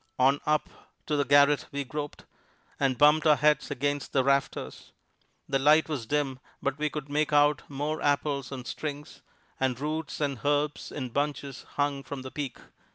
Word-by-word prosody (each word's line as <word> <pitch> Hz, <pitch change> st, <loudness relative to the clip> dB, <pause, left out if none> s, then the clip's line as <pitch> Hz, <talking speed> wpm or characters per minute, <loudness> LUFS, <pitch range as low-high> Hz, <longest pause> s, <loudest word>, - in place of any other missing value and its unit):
On 135 Hz, +2 st, +4 dB
up 150 Hz, 0 st, +2 dB, 0.4 s
to 150 Hz, -, 0 dB
the 145 Hz, -, +2 dB
garret 145 Hz, 0 st, +5 dB
we 140 Hz, 0 st, -2 dB
groped, 145 Hz, +2 st, -6 dB, 0.5 s
and 135 Hz, -3 st, +1 dB
bumped 150 Hz, +3 st, +5 dB
our 150 Hz, -, +7 dB
heads 150 Hz, +2 st, +2 dB
against 145 Hz, 0 st, -2 dB
the 130 Hz, -, +3 dB
rafters. 140 Hz, 0 st, -1 dB, 0.5 s
The 135 Hz, -, +1 dB
light 150 Hz, +3 st, +5 dB
was 140 Hz, -8 st, -4 dB
dim, 140 Hz, -1 st, -1 dB, 0.2 s
but 140 Hz, +1 st, -2 dB
we 150 Hz, 0 st, +1 dB
could 150 Hz, -1 st, -6 dB
make 150 Hz, +1 st, 0 dB
out 145 Hz, 0 st, +4 dB
more 150 Hz, +3 st, -3 dB
apples 140 Hz, -2 st, 0 dB
on 130 Hz, -2 st, -6 dB
strings, 150 Hz, +1 st, -6 dB, 0.4 s
and 130 Hz, -2 st, 0 dB
roots 155 Hz, +2 st, -3 dB
and 140 Hz, -4 st, -1 dB
herbs 145 Hz, +1 st, 0 dB
in 130 Hz, -3 st, -4 dB
bunches 140 Hz, +1 st, -3 dB
hung 145 Hz, -1 st, 0 dB
from 135 Hz, -1 st, -7 dB
the 130 Hz, -, -7 dB
peak. 140 Hz, -5 st, -4 dB
145 Hz, 170 wpm, -28 LUFS, 135-150 Hz, 0.5 s, our